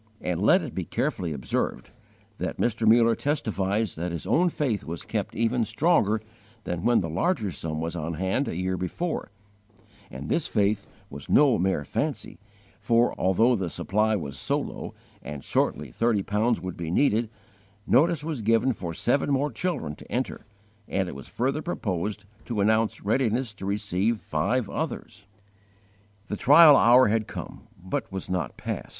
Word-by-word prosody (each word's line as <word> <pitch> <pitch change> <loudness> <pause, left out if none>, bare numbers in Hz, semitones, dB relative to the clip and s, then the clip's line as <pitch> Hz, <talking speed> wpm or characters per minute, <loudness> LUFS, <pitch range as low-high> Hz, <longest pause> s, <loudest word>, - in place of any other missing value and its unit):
And 90 -2 -2
let - - +5
it - - -6
be - - -2
carefully 85 -3 -2
observed 70 -4 -3 0.5
that - - -3
Mr. 115 -1 0
Muller 115 +1 +6
testifies 110 - -1
that 85 +2 -4
his 85 0 -5
own 165 - +3
faith 130 -10 -1
was 80 +1 -6
kept - - -3
even 115 +1 +1
stronger 110 - +2 0.4
than 90 -1 -3
when 120 +1 +4
the 85 - -3
larger 105 - 0
sum 80 0 -4
was 80 +2 -3
on 80 0 -3
hand 95 - -1
a - - -3
year 90 +1 -1
before; 155 - -3 0.8
and 65 +3 -7
this 165 - 0
faith 105 -1 0 0.2
was 70 +1 -9
no 140 - +5
mere 90 -5 0
fancy, - - -3 0.4
for, 120 +1 +2
although 115 +7 +3
the 95 -5 -2
supply 105 +6 0
was 70 -8 -5
so - - 0
low - - -7 0.3
and 75 -2 -7
shortly 75 -4 -1
thirty 115 - +1
pounds 110 +4 +1
would 90 -1 -6
be 85 -2 -4
needed, 115 - +2 0.6
notice 155 +4 +3
was 155 -6 -3
given 115 +4 +2
for 85 -6 -6
seven 135 - +1
more 140 +1 +1
children 140 - -3
to - - -14
enter, 125 -3 -3 0.4
and 95 -2 -1
it - - -7
was 70 - -10
further 135 +5 -1
proposed 105 - -3 0.2
to 115 -4 -3
announce 110 +1 +1
readiness 115 +1 +1
to 95 -1 -7
receive 100 +2 0
five - - -1
others! 100 - -5 1.0
The 105 - -4
trial 150 +4 +8
hour 125 -1 +6
had 110 0 0
come, - - -8
but 95 +2 -4
was 95 -1 -5
not 90 -6 -2
past. - - -5
105 Hz, 165 wpm, -26 LUFS, 90-120 Hz, 1.0 s, trial